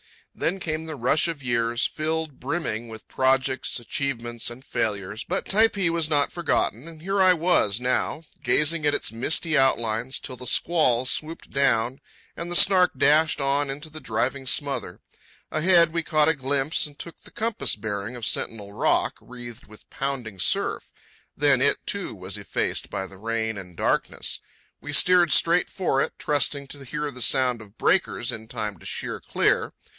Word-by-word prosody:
Then 185 +4 -1
came 160 -2 -3
the 160 -1 -6
rush 135 +6 +2
of 160 -5 -5
years, 120 -1 +1
filled 155 -2 -3
brimming 125 -5 -3
with 110 -1 -11
projects, 130 -1 +1
achievements, 120 -2 -3
and 125 +3 -12
failures; 105 -4 -2
but 185 - -1
Typee 200 -4 +3
was 165 -2 +1
not 145 -2 +2
forgotten, 160 -6 -1
and 160 -2 -12
here 195 +3 0
I 185 -1 +7
was 165 - +2
now, 125 +5 -1 0.2
gazing 150 +1 +1
at 145 - +3
its - - -1
misty 155 +7 0
outlines 120 -2 +1
till 130 -2 -6
the 125 - -5
squall 130 -6 +3
swooped 155 +5 -1
down 130 -2 +1 0.4
and 170 +1 -6
the 175 - -2
Snark 185 -1 +5
dashed 150 +3 +4
on 140 +1 +1
into 145 +3 -6
the 155 - -7
driving 130 +2 -2
smother. 135 -10 -2 0.5
Ahead, 170 +1 +5
we 170 - 0
caught 155 -1 +2
a - - +4
glimpse 140 +2 0
and 145 -1 -16
took 170 - -9
the - - -13
compass 220 - 0
bearing 105 +2 -4
of 120 -3 -5
Sentinel 100 -3 -3
Rock, 105 - +1
wreathed 120 -2 -11
with 105 0 -15
pounding 125 -8 -4
surf. - - 0 0.5
Then 140 -2 +4
it, 140 - +2
too, 200 - -3
was 95 +2 -5
effaced 100 - -2
by 95 - -3
the 95 0 -13
rain 110 0 -2
and 90 -3 -10
darkness. - - -1 0.4
We 145 - -7
steered 175 +2 +5
straight 170 +2 +4
for 155 -8 0
it, - - -1
trusting 140 -1 -1
to 140 -2 -7
hear 150 +2 -3
the 125 - -9
sound 125 -2 +2
of 105 0 -16
breakers - - +1
in 110 0 -7
time 105 -4 -4
to - - -16
sheer - - -4
clear. - - +1
135 Hz, 170 wpm, -25 LUFS, 115-160 Hz, 0.5 s, I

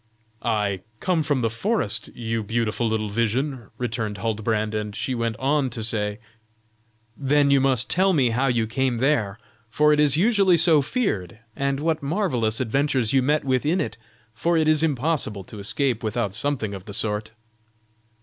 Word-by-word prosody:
"I 105 -4 0 0.2
come 180 -3 +1
from 145 -4 0
the 115 - +1
forest, 210 - 0
you 115 -1 -2
beautiful 115 +2 -1
little 110 -1 -1
vision," 120 +3 -1
returned 115 -4 -3
Huldbrand; 110 -1 -1
and 105 -1 -3
she 130 - -2
went 115 -2 -1
on 140 0 +1
to 115 -2 -6
say: 105 -2 -2 1.0
"Then 140 0 +2
you 140 -1 +4
must 130 -3 +2
tell 190 +2 +3
me 135 -9 +2
how 130 +4 +1
you 120 -3 +1
came 125 +2 -1
there, 115 -6 +1 0.3
for 150 +6 +3
it 150 - +1
is 150 -1 +4
usually 195 -2 +4
so 160 -2 +5
feared, 135 - -2 0.2
and 140 0 -1
what 160 +1 0
marvellous 140 - 0
adventures 130 -1 0
you 135 - +4
met 150 +4 +1
with 130 -2 +1
in 165 +5 +1
it, 110 - -2 0.4
for 170 +8 +1
it 160 -1 +2
is 155 -1 +5
impossible 140 -8 -1
to 105 +3 -11
escape 125 +3 -1
without 110 -3 -2
something 115 -3 -1
of 95 -1 -8
the 100 - -5
sort." 105 0 -1
125 Hz, 170 wpm, -23 LUFS, 110-150 Hz, 1.0 s, so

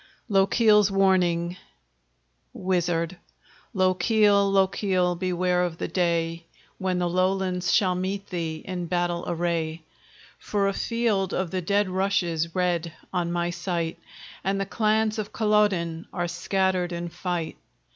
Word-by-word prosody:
LOCHIEL'S 210 +1 +4
WARNING 180 -3 +2 1.0
WIZARD 175 -2 -1 0.6
Lochiel, 200 +2 +3
Lochiel! 190 -2 +2
beware 180 0 0
of 170 -2 -3
the - - -3
day 165 -1 -1 0.3
When 185 -1 0
the 175 0 0
Lowlands 185 0 0
shall 185 -5 +3
meet 190 +2 -3
thee 165 -3 -3
in 180 -2 -4
battle 175 0 -1
array! 165 -2 -2 0.6
For 200 -1 0
a 195 - 0
field 215 -4 0
of 185 -3 -2
the 185 - -1
dead 200 +3 +1
rushes 180 -4 0
red 175 -2 0 0.2
on 175 -2 0
my 175 0 -1
sight, 170 -2 -3 0.4
And 195 +1 0
the 195 - -1
clans 215 +1 +1
of 210 -1 -4
Culloden 205 -7 +1
are 175 -2 -2
scattered 185 0 0
in 175 0 -4
fight. 175 -1 -4
180 Hz, 125 wpm, -25 LUFS, 170-195 Hz, 1.0 s, LOCHIEL'S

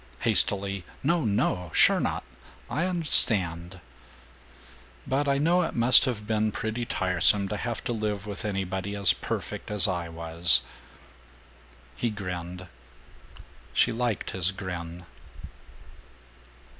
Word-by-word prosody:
Hastily, 100 -1 +1 0.2
"No, 165 0 +1
no! 90 -4 -1
Sure - - +4
not. - - -3 0.5
I 165 - -1
und'stand." 95 - +2 1.3
"But 140 +2 -1
I 140 0 +1
know 170 +5 +2
it 165 - -3
must 120 +3 +6
have 115 -5 -4
been 110 0 0
pretty 110 +3 -4
tiresome 95 +2 +1
to 105 - -3
have 120 +1 -5
to 120 - -3
live 105 -3 -3
with 105 +1 -7
anybody 95 -1 -4
as 100 -1 +3
perfect - - -6
as 105 -2 +5
I 90 -3 -3
was." 85 -4 +3 1.3
He 120 - -2
grinned. 90 -3 -7 1.1
She - - +3
liked 120 -3 -3
his 95 0 +3
grin. 90 -2 -7
100 Hz, 120 wpm, -26 LUFS, 90-115 Hz, 1.3 s, must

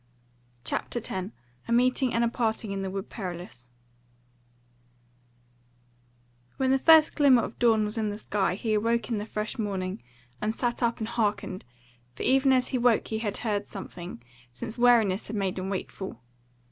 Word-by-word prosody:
CHAPTER 240 - -2
10 190 -3 -4 0.4
A - - -4
Meeting 255 +2 +3
and 230 0 +1
a - - +3
Parting 225 -3 -1
in 195 0 -3
the 190 - -3
Wood 195 0 -5
Perilous 175 - -7 2.9
When 265 -1 +2
the 270 - +3
first 320 +1 +7
glimmer 265 -5 +5
of - - -7
dawn 225 -3 +4
was 210 +2 -3
in 215 -1 0
the 205 - -4
sky 200 -3 0
he 220 +2 -1
awoke 230 +3 +1
in 225 - +1
the 210 - -5
fresh 215 +1 -4
morning, 195 -2 -3 0.4
and 215 +1 -1
sat 240 0 -1
up 235 -1 +1
and 220 - -3
hearkened, 210 -5 -1 0.5
for - - -5
even 270 +1 +4
as 255 -1 +2
he 255 - 0
woke 240 -2 +3
he 220 - -2
had 205 -3 -2
heard 205 -2 -1
something, 175 - -8 0.3
since 220 - -6
wariness 230 -5 +4
had 215 - -5
made 195 -2 -1
him 185 +1 -3
wakeful. 190 - -5
220 Hz, 170 wpm, -27 LUFS, 195-240 Hz, 2.9 s, first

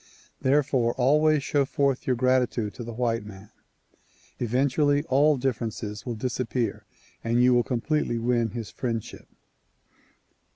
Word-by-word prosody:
Therefore 130 -3 +2
always 150 +3 +3
show 145 -1 +1
forth 140 -1 -1
your 130 - +2
gratitude 125 -3 +1
to 120 - -8
the 120 - -6
white 115 -2 0
man. 105 -1 -12 0.9
Eventually 140 +4 +1
all 145 +2 +4
differences 115 -4 -3
will 120 - -2
dis 125 +3 -3
appear 120 -3 -2 0.4
and 120 +2 +2
you 125 0 +5
will 120 - +4
completely 125 +1 -1
win 120 0 +1
his 115 0 -6
friendship. 115 -4 -5
125 Hz, 130 wpm, -26 LUFS, 115-135 Hz, 0.9 s, you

